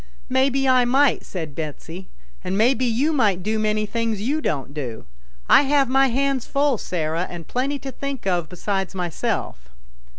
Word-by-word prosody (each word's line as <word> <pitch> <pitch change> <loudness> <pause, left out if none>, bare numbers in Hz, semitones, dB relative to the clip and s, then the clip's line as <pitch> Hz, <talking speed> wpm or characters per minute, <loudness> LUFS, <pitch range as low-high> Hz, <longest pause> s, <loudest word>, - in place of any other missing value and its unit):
" - - -29
Maybe 270 0 +2
I 255 -1 +5
might," 265 +2 +3
said 160 -6 -6
Betsy, 160 +4 -7 0.2
" - - -29
and 190 - -2
maybe 245 +3 +3
you 255 +7 +1
might 205 -10 +2
do 215 +2 0
many 215 0 +1
things 230 0 -2
you 280 +9 -1
don't 140 - -2
do. 125 - -5 0.4
I - - +7
have 280 -2 +2
my 270 +1 +4
hands 270 0 0
full, 280 -4 +1
Sarah, 165 0 -2
and 170 -2 -8
plenty 275 +3 -1
to 270 -1 -7
think 275 -3 -5
of 175 -4 0
besides 195 +1 -3
myself." 165 - -3
220 Hz, 175 wpm, -22 LUFS, 175-270 Hz, 0.4 s, I